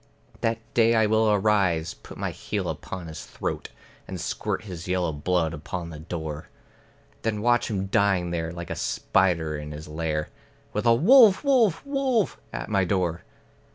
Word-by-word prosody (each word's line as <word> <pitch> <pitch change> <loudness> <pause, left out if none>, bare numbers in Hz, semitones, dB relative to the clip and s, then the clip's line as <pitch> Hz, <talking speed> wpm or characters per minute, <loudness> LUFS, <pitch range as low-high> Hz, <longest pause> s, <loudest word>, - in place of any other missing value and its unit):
That 115 0 0 0.2
day 115 0 +4
I 110 -1 +4
will 110 +1 +3
arise, 95 -5 +2
put - - -13
my - - -2
heel - - -3
upon 95 -2 -6
his 80 -1 -7
throat, - - -4 0.4
And 95 - -6
squirt - - -3
his 90 -5 -8
yellow 90 -2 0
blood 80 +2 0
upon 85 +2 -5
the 75 - -8
door; 80 -2 -5 0.7
Then 110 -2 -1
watch 120 0 +3
him 95 -3 -1
dying 95 -3 +2
there, 80 -1 -2
like 85 -1 -7
a - - -2
spider 85 -5 +1
in 75 0 -6
his 75 +1 -8
lair, 75 0 -2 0.4
With 105 +3 0
a 115 - +7
"Wolf, 215 - +7
wolf, 240 - +3
wolf!" 270 -6 0
at - - -5
my 100 -3 +2
door. 90 -3 0
95 Hz, 165 wpm, -26 LUFS, 80-110 Hz, 0.7 s, a